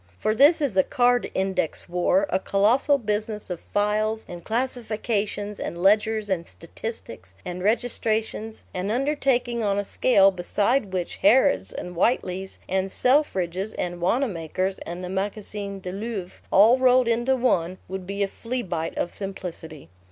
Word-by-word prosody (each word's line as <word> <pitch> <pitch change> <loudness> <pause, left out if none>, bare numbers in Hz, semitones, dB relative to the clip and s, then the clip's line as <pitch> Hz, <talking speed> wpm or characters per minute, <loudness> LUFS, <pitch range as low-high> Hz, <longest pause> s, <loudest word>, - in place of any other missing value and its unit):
For 215 - 0
this 290 +8 +5
is 275 -9 0
a 190 - +6
card 245 0 +2
index 190 -4 -1
war, 180 +12 +2
a 185 - +2
colossal 230 +10 +3
business 210 -3 -3
of 175 - -4
files 215 +2 -1
and 175 -1 -9
classifications 220 -4 -2
and 170 - -4
ledgers 210 +3 +2
and 180 -4 -2
statistics 115 - -8
and 180 0 -5
registrations, 220 0 -1
an 185 +1 -3
undertaking 250 -1 0
on 200 -1 +1
a 205 - 0
scale 195 -2 +4
beside 200 +5 0
which 180 -2 -3
Harrod's 195 - +4
and 180 0 -7
Whiteley's 190 -1 0
and 190 +1 0
Selfridge's 195 - +1
and 175 -1 -4
Wanamaker's 185 - -1
and 175 +2 -6
the 180 - -5
Magazin 200 +1 -4
du 180 - -5
Louvre, 200 -2 -5
all 225 +6 +6
rolled 255 -1 +4
into 240 +3 +2
one, 185 -8 +1
would 185 -1 -6
be 200 +1 -1
a - - +1
fleabite 190 -8 -4
of 175 - -2
simplicity. 180 -6 -7
205 Hz, 145 wpm, -24 LUFS, 185-235 Hz, -, a